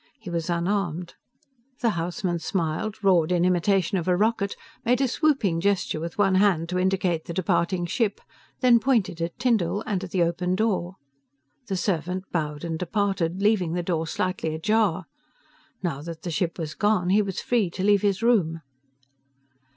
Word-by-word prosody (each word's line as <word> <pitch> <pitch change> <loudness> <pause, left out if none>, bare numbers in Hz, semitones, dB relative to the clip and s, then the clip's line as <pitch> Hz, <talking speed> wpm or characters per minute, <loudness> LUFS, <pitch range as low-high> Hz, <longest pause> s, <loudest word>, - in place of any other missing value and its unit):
He 210 -6 -8
was 170 0 -2
unarmed. 175 -1 -1 0.7
The 235 -2 +3
houseman 175 0 -2
smiled, 180 +5 -2
roared 180 -4 +4
in 175 -1 +3
imitation 185 +1 +2
of 170 - -5
a 180 -1 +3
rocket, 210 -1 +1 0.3
made 245 +1 +2
a 270 - +2
swooping 255 - +1
gesture 200 -4 0
with 165 +1 -6
one 195 -2 +3
hand 170 -5 +2
to 180 0 -1
indicate 185 -3 0
the 170 - -6
departing 175 -1 0
ship, 205 +4 -1 0.4
then 245 -2 +6
pointed 215 -9 +1
at 170 0 -3
Tyndall 220 -6 +1
and 195 -3 -2
at 190 - -6
the 175 -1 +2
open 180 +2 0
door. 190 -4 0 0.7
The 195 - -2
servant 180 0 -1
bowed 150 -3 -2
and 165 -1 -3
departed, 190 -1 -1
leaving 195 -6 +2
the 175 0 -1
door 165 -2 -1
slightly 170 -3 -2
ajar. 215 +7 +1 0.8
Now 155 -6 -2
that 165 0 -8
the 175 - -3
ship 170 +2 -1
was 160 -3 -4
gone, 205 -4 +1
he 210 +2 +5
was 195 -3 -3
free 230 -7 +1
to 185 +2 -5
leave 205 -1 +4
his 200 +1 0
room. 175 -9 +2
185 Hz, 170 wpm, -25 LUFS, 170-205 Hz, 0.8 s, then